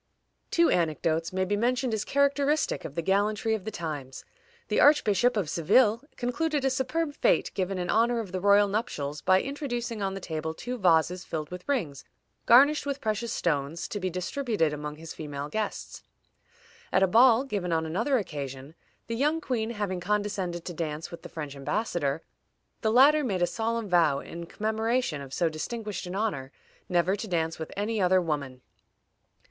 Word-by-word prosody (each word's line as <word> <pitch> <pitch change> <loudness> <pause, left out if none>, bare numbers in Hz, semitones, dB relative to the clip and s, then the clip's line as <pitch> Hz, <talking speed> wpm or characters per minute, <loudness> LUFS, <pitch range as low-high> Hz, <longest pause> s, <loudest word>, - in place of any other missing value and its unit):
Two 335 0 +3
anecdotes 165 -1 0
may 185 0 0
be 205 +2 0
mentioned 245 +2 0
as 215 -1 -1
characteristic 280 +3 +1
of 145 - -7
the 170 - -2
gallantry 210 +4 +1
of 215 -4 -3
the - - -2
times. 150 -9 -6 0.4
The - - +1
Archbishop 245 -5 +4
of 195 -6 0
Seville 210 +9 +3 0.2
concluded 290 +3 -1
a 270 - +3
superb 285 +4 -1
fête, - - +2
given 190 0 -2
in 180 -1 -1
honor 235 +1 +3
of 210 -5 -5
the 185 0 -3
royal 205 +1 +5
nuptials, 150 - -3
by 185 0 +4
introducing 245 -6 -4
on 195 -1 -1
the - - -4
table 160 -3 -4
two 245 +5 -5
vases 180 0 +3
filled 155 -1 -5
with 180 +8 -8
rings 165 - -1 0.4
garnished 280 +5 +6
with 280 0 -2
precious 220 -1 -2
stones, 150 0 -1
to 205 - -3
be 185 -1 -1
distributed 185 - -1
among 150 0 -5
his 160 +1 -9
female 145 -2 -6
guests. 215 +6 -4 0.9
At 190 - +4
a - - +5
ball 235 +4 +6
given 200 -10 -3
on 160 -1 +1
another 225 - +1
occasion, 140 - -6 0.3
the 230 - -3
young 300 +6 +1
queen 240 -7 -2
having 205 -5 -3
condescended 195 -3 -2
to 175 - -5
dance 155 -1 -4
with 170 - -9
the - - -10
French 150 -3 -6
embassador, 150 0 -2 0.6
the 220 - +1
latter 290 +6 +6
made 190 -8 0
a - - +6
solemn 230 +3 -2
vow, 170 -6 +3
in 170 +4 -7
commemoration 220 - -1
of 135 -1 -9
so 170 +5 +1
distinguished 210 +5 -4
an 180 - -5
honor, 150 -11 -2 0.4
never 180 +1 +2
to 215 +2 -6
dance 165 -3 -1
with 160 - -6
any 210 +1 -1
other 185 0 +4
woman. 140 -7 -3
195 Hz, 175 wpm, -28 LUFS, 160-235 Hz, 0.9 s, garnished